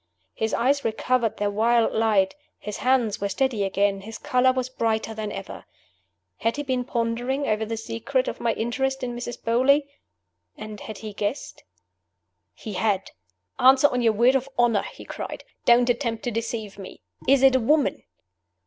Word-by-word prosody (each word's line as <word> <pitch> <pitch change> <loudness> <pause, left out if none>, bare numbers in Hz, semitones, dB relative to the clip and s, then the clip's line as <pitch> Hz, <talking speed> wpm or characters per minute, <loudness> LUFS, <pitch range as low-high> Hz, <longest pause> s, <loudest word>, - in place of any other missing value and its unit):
His 220 0 -2
eyes 275 +4 +2
recovered 225 +1 0
their 205 0 0
wild 230 +2 +2
light; 210 -4 +2 0.2
his 210 -1 -6
hands 250 -6 +1
were 200 - -1
steady 245 -1 0
again; 195 0 +1
his 220 +3 -8
color 255 -2 +2
was 255 -1 -2
brighter 225 -3 -1
than 215 -1 -4
ever. 195 - -8 0.7
Had 230 +1 0
he 290 - -2
been 260 -3 -1
pondering 245 +3 -1
over 215 0 0
the 225 0 -3
secret 240 +4 -2
of - - -4
my 230 -1 +1
interest 265 +4 -2
in 245 -1 -3
Mrs. 240 0 -6
Beauly? 260 +5 +3 0.7
and 215 -1 -8
had 215 0 -8
he 215 -2 -7
guessed? 205 +6 -4 0.9
He 215 - -7
had! 195 0 0 0.5
"Answer 265 +2 +6
on 250 - -1
your 225 -2 +3
word 240 +5 +4
of 270 0 0
honor!" 235 -4 +3
he - - -12
cried. - - -6 0.2
"Don't 240 0 +5
attempt 235 -2 -1
to 245 - -2
deceive 220 -3 -4
me! 190 - -10 0.3
Is 270 0 +4
it 265 -1 +6
a - - +4
woman?" 290 +5 +2
230 Hz, 170 wpm, -24 LUFS, 215-255 Hz, 0.9 s, Answer